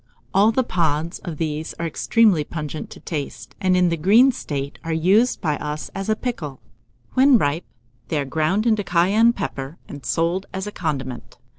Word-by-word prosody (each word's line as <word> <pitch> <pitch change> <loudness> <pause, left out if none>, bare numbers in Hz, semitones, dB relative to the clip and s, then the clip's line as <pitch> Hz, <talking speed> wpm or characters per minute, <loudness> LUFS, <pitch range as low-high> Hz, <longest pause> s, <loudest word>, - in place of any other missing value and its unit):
All 205 +3 +5
the 260 +3 +1
pods 165 -4 -1
of 165 -4 -6
these 155 0 -3
are 170 - -4
extremely 195 +1 +3
pungent 155 0 -6
to - - -11
the - - -26
taste, 150 -4 -5
and 185 -2 +3
in 180 -1 +4
the 170 - -1
green 220 - +6
state 140 - -5
are 165 - -3
used 190 +10 +3
by 150 -3 0
us 150 +1 -5
as 195 +2 -4
a 215 - +3
pickle. 170 - -4 0.5
When 265 0 +6
ripe, 150 -2 0 0.4
they 155 - -1
are 145 - 0
ground 160 - 0
into 215 -3 +2
cayenne 195 +6 +4
pepper, 135 - -5
and 145 -2 -9
sold 170 +4 0
as 190 +1 -3
a 210 - -5
condiment. 130 - -4
170 Hz, 185 wpm, -22 LUFS, 150-205 Hz, 0.5 s, green